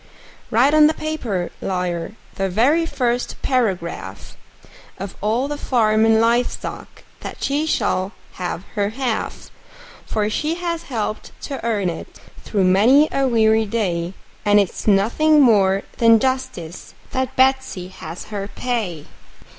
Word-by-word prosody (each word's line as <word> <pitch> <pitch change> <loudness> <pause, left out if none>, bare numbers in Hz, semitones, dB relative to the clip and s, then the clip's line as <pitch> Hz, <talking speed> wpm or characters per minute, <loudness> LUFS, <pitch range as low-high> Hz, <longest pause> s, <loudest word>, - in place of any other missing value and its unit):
Write 255 +6 +3
on 305 -1 +7
the 315 - 0
paper, 235 - -3
lawyer 180 -1 -2 0.2
the 195 0 -2
very 280 - +2
first 245 -4 -1
paragraph 170 - -2 0.6
Of 195 +1 -7
all 225 +6 0
the 295 0 -4
farm 220 -3 +2
and 220 0 +4
live 235 +2 +3
stock - - -8 0.2
that - - -8
she 290 +3 0
shall 190 -10 0 0.3
have 180 0 -3
her 205 -1 0
half; 245 -5 -3 0.6
For 210 -1 0
she 305 +9 -1
has 340 -2 -4
helped 215 -3 -4
to 275 -5 -5
earn 215 -5 0
it, 165 -2 -6 0.2
through 200 -3 0
many 230 +12 +5
a 275 -1 +1
weary 220 -2 +3
day, 185 -5 -2 0.3
And 205 0 +5
it's 200 +1 -2
nothing 235 +10 +4
more 200 -7 +4 0.2
than 230 -1 +7
justice 215 -10 -3 0.2
that 260 -1 -2
Betsey 265 -8 +1
has 175 -2 -8
her 200 -1 -3
pay. 210 -11 -3
220 Hz, 140 wpm, -21 LUFS, 190-260 Hz, 0.6 s, on